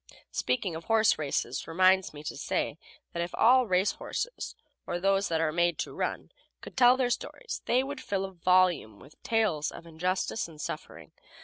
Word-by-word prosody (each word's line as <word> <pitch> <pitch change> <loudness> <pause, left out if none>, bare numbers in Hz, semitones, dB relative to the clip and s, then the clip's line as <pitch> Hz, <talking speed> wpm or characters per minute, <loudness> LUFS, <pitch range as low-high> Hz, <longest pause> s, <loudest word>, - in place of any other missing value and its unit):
Speaking 210 -8 -1
of 165 - -7
horse 225 -5 +3
races 140 -3 -2
reminds 185 +3 +4
me 150 0 -10
to - - -5
say - - -2 0.3
that 170 - -2
if 170 +1 -4
all 250 +1 +5
race 185 +1 +3
horses, - - -5 0.3
or 175 - -2
those 195 +2 +2
that 165 -1 0
are 160 -1 +1
made 170 0 +1
to - - -4
run, - - -3 0.3
could - - -11
tell 250 0 +6
their 250 -2 +1
stories 470 - -4
they 250 +2 +3
would 285 +2 -6
fill 195 -1 -2
volumes 180 - +2
with 140 +3 -17
tales 210 -10 +1
of 170 - -11
injustice 180 +6 -2
and 160 -2 -14
suffering. - - -7
185 Hz, 180 wpm, -29 LUFS, 165-225 Hz, 0.3 s, tell